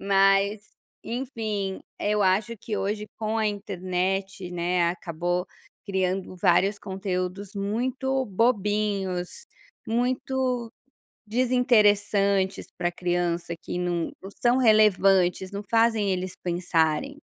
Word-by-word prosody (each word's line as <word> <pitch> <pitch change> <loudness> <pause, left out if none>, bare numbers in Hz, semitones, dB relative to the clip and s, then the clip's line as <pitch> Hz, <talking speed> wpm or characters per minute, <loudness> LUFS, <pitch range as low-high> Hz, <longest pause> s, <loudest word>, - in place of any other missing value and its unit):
Mas 195 +1 +3 0.4
enfim, 220 -6 -3 0.2
eu 210 0 +1
acho 205 +5 +1
que 210 +1 -4
hoje 210 +2 -2
com 220 0 -1
a 215 - +2
internet, 190 -2 -2
né, 175 0 +1
acabou 175 +1 -2 0.4
criando 190 -1 -2
vários 190 +3 +3
conteúdos 190 0 -4
muito 255 +6 -1
bobinhos, 205 -4 0 0.4
muito 250 0 -1 0.6
desinteressantes 205 -5 +2
pra 175 -1 -1
criança, 175 -1 -1
que 180 - -5
não 175 -1 -1
não 195 - -8
são 240 +1 +4
relevantes, 195 -5 +4
não 200 0 -5
fazem 225 -3 +3
eles 185 0 -2
pensarem. 170 - 0
195 Hz, 100 wpm, -26 LUFS, 180-220 Hz, 0.6 s, são